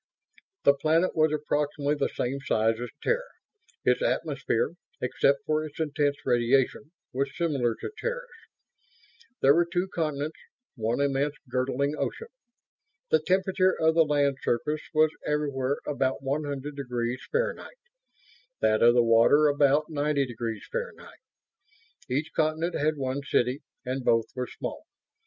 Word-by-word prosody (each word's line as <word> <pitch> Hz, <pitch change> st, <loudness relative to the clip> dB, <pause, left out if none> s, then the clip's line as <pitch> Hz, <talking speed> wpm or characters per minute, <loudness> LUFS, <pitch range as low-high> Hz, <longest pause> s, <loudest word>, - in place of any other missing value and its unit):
The 140 Hz, -, +7 dB
planet 160 Hz, +5 st, +1 dB
was 155 Hz, -1 st, +3 dB
approximately 150 Hz, -1 st, 0 dB
the 150 Hz, -, 0 dB
same 135 Hz, +3 st, -2 dB
size 110 Hz, -2 st, +1 dB
as 120 Hz, -, -4 dB
Terra; -, -, 0 dB, 0.6 s
its -, -, +3 dB
atmosphere, 480 Hz, -1 st, 0 dB, 0.3 s
except 140 Hz, 0 st, +1 dB
for 155 Hz, 0 st, +1 dB
its 155 Hz, 0 st, -9 dB
intense 145 Hz, -2 st, 0 dB
radiation, 130 Hz, +4 st, +2 dB, 0.2 s
was 135 Hz, +1 st, -2 dB
similar 135 Hz, -9 st, 0 dB
to -, -, -6 dB
Terra's. -, -, -3 dB, 1.2 s
There 135 Hz, +1 st, +7 dB
were 170 Hz, +2 st, +3 dB
two 180 Hz, +1 st, 0 dB
continents; 155 Hz, -2 st, -2 dB, 0.4 s
one 115 Hz, 0 st, -1 dB
immense 140 Hz, +1 st, +1 dB
girdling 130 Hz, +3 st, 0 dB
ocean. 460 Hz, +1 st, -3 dB, 0.8 s
The 470 Hz, -, +5 dB
temperature 185 Hz, 0 st, +2 dB
of 160 Hz, 0 st, +4 dB
the 165 Hz, 0 st, +5 dB
land 145 Hz, -2 st, +1 dB
surface 150 Hz, +6 st, -1 dB
was 155 Hz, -1 st, +4 dB
everywhere 140 Hz, -2 st, -1 dB
about 135 Hz, -2 st, -1 dB
100°F, 140 Hz, -, -2 dB, 0.9 s
that 110 Hz, 0 st, +2 dB
of 120 Hz, +1 st, +6 dB
the 120 Hz, -, +5 dB
water 115 Hz, +6 st, +5 dB
about 145 Hz, +1 st, +3 dB
90°F. 145 Hz, -, -2 dB, 1.0 s
Each 150 Hz, +6 st, -1 dB
continent 160 Hz, +2 st, 0 dB
had 155 Hz, +1 st, 0 dB
one 135 Hz, 0 st, -2 dB
city, 130 Hz, 0 st, 0 dB, 0.2 s
and 130 Hz, +1 st, -3 dB
both 115 Hz, -2 st, +3 dB
were 125 Hz, -1 st, -2 dB
small. -, -, -7 dB
145 Hz, 125 wpm, -27 LUFS, 130-155 Hz, 1.2 s, The